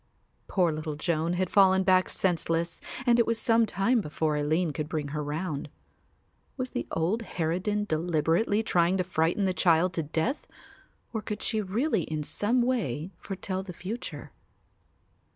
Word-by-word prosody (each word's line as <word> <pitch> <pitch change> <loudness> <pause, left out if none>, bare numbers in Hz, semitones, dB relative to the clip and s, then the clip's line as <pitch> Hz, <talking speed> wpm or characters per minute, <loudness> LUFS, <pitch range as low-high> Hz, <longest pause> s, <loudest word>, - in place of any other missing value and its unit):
Poor 180 -4 +2
little 155 0 -4
Joan 165 +2 0
had 185 0 -1
fallen 190 -1 +5
back 185 -1 +4
senseless 170 -2 0 0.2
and 240 -1 +4
it 235 - +3
was 230 0 +1
some 225 0 +3
time 220 +5 +2
before 155 -2 -1
Aline 155 +2 +1
could 150 0 -4
bring 150 -3 -2
her 150 +1 -3
round. 150 0 -3 0.9
Was 255 -1 -3
the - - -3
old 175 +8 0
harridan 185 +2 -1
deliberately 170 +5 +1
trying 175 -2 +2
to 185 - +1
frighten 175 +2 +1
the 185 - +1
child 175 0 +3
to 165 - 0
death 160 - -2 0.7
or 220 - -2
could 210 0 -5
she 220 -1 +1
really 215 - 0
in 155 -1 -3
some 235 +10 +1
way 190 - -1
foretell 190 +1 -4
the 190 -2 -8
future? 200 +8 -6
180 Hz, 155 wpm, -28 LUFS, 160-210 Hz, 0.9 s, fallen